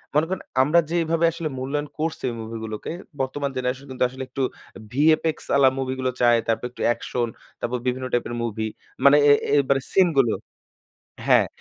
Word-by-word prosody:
মনে 150 +2 +4
করেন 190 0 -3 0.2
আমরা 155 +5 +4
যেইভাবে 165 -1 +1
আসলে 165 -1 -4
মূল্যায়ন 145 +3 -2
করছি 160 +1 -2
ওই 120 - -5
মুভিগুলোকে 110 -1 -6 0.3
বর্তমান 140 +2 -2
জেনারেশন 130 +2 -2
কিন্তু 130 - -1
আসলে 130 +1 -7
একটু 135 +1 -2 0.5
VFX 155 +3 +3 0.2
আলা 135 -1 +6
মুভি 130 -1 -1
গুলো 130 0 0
চায়। 120 -1 +5
তারপর 115 +1 0
একটু - - -11
অ্যাকশন 120 0 -1 0.3
তারপর 125 +1 -2
বিভিন্ন 130 +1 -1
টাইপের 120 0 0
মুভি। 110 -1 -2 0.4
মানে 140 +1 +8
এ - - +9 0.2
এ - - +2
এবারে 135 0 +1
সিন 190 -2 +6
গুলো 120 -5 +3 0.9
হ্যাঁ। - - +5
130 Hz, 170 wpm, -24 LUFS, 120-150 Hz, 0.9 s, এ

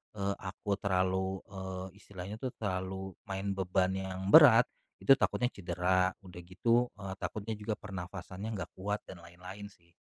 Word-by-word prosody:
eee, 100 -1 -1
aku 100 +1 -3
terlalu, 95 0 0
eee, 95 0 -6
istilahnya 100 +1 -7
tuh 130 -1 -3
terlalu 95 -1 -3 0.2
main 95 +1 -3
beban 95 -1 +1
yang 95 0 -4
berat, 125 -7 +10 0.4
itu 135 0 +7
takutnya 125 -1 +1
cedera. 90 0 +1
Udah 90 -3 -11
gitu, 115 +7 +2
eee, 95 -1 -4
takutnya 110 +1 -4
juga 105 +1 -2
pernapasannya 95 +2 -6
nggak 90 -3 -5
kuat 105 +2 -2
dan 95 - -8
lain-lain 90 +4 -9
sih. 85 -1 -28
95 Hz, 150 wpm, -32 LUFS, 95-105 Hz, 0.4 s, berat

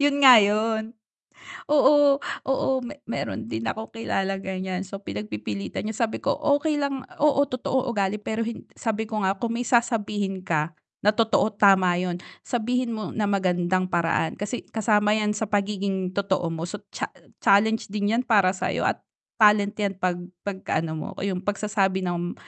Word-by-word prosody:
'Yun 285 0 +3
nga 255 -3 +11
'yun. 220 +2 +1 0.8
Oo, 290 -1 +5 0.2
oo 270 0 0
me 265 +4 -8
mayro'n 230 0 -4
din 115 - -4
akong 220 - -4
kilalang 195 -3 -2
ganyan 190 0 -3
so 195 +1 -8
pinagpipilitan 105 - -5
niya 220 +2 -1
sabi 220 - -6
ko, - - 0
"Okey 295 +1 +1
lang 275 -2 -2
oo 285 -1 +4
totoo 255 +1 -1
ugali, 205 -3 0
pero 220 +2 -2
hin 230 +1 -6
sabi 220 -1 -2
ko 215 -2 -2
nga 190 +1 +1
kung 230 -1 -2
may 245 - -1
sasabihin 210 -5 0
ka 160 -2 -1 0.3
na 210 +1 +4
totoo, 225 -2 +3
tama 190 -3 +5
'yun. 180 -1 -2 0.3
Sabihin 245 +1 -1
mo 215 -1 -4
na 215 - +1
magandang 185 -1 +1
paraan 165 -2 0
kasi 205 +5 -5
kasama 210 -1 +3
yan 210 -1 +1
sa 210 +1 -2
pagiging 195 -2 -1
totoo 190 -3 0
mo 165 +1 -4
so 205 +3 -7
cha - - -3 0.3
challenge 220 +2 +3
din 205 0 -1
yan 250 - +1
para 200 -5 +4
sayo 185 - -2
at - - +1 0.4
talent 210 -1 +5
yan 200 -2 0
'pag 180 -1 +1 0.3
'pag-ano 190 -5 -2
mo 155 - -5 0.2
yung 190 -2 -1
pagsasabi 200 -2 0
ng, 175 -1 -2
205 Hz, 165 wpm, -25 LUFS, 190-225 Hz, 0.8 s, nga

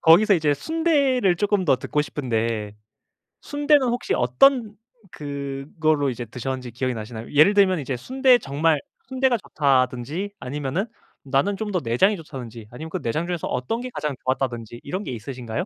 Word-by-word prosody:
거기서 190 +6 +6
이제 155 -4 +2
순대를 280 - +2
조금 205 0 +1
더 135 - +4
듣고 150 +3 -1
싶은데, 115 -7 -2 0.7
순대는 290 -2 +2
혹시 240 +1 -1
어떤 215 - +3 0.3
그걸로 145 +1 -1
이제 120 -1 -4
드셨는지 125 +1 -5
기억이 130 +2 -2
나시나요? 110 0 -7
예를 155 +8 +6
들면 190 -3 +4
이제 135 -3 -3
순대 260 - +4
정말 150 - +1 0.3
순대가 260 -1 +2
좋다든지 140 - 0
아니면은 145 +7 -2 0.4
나는 140 +10 +1
좀 215 0 -3
더 185 - +1
내장이 135 - +3
좋다든지, 125 - -9
아니면 155 +7 -8
그 180 +1 -4
내장 155 +8 -1
중에서 175 -2 -3
어떤 175 - -2
게 255 - -5
가장 150 -2 -3
좋았다든지 120 -3 -2
이런 185 +8 -4
게 - - -5
있으신가요? 120 +4 -5
150 Hz, 375 characters per minute, -23 LUFS, 125-200 Hz, 0.7 s, 거기서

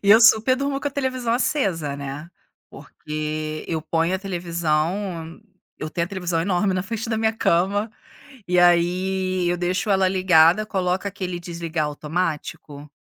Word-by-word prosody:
E 200 - +3
eu 220 +2 +9
super 225 +3 +6
durmo 275 0 -2
com 285 - -1
a - - -12
televisão 255 -4 -1
acesa, 195 - 0
né, 140 +3 -6 0.4
porque 155 0 -5
eu 160 -2 -2
ponho 165 +3 0
a - - -1
televisão 170 0 -2 0.4
eu 155 - -5
tenho 170 +1 -1
a - - -13
televisão 180 -4 -2
enorme 190 +2 +1
na 185 - 0
frente 225 +3 -4
da 220 - 0
minha 220 0 +2
cama 205 +2 +1 0.6
e 180 - +2
aí, 180 +1 +2
eu 175 - +1
deixo 180 +4 -1
ela 190 -1 +3
ligada, 185 0 +4
coloca 190 -1 -1
aquele 185 -3 -5
desligar 170 -2 -3
automático 150 -1 -4
180 Hz, 155 wpm, -23 LUFS, 165-200 Hz, 0.6 s, eu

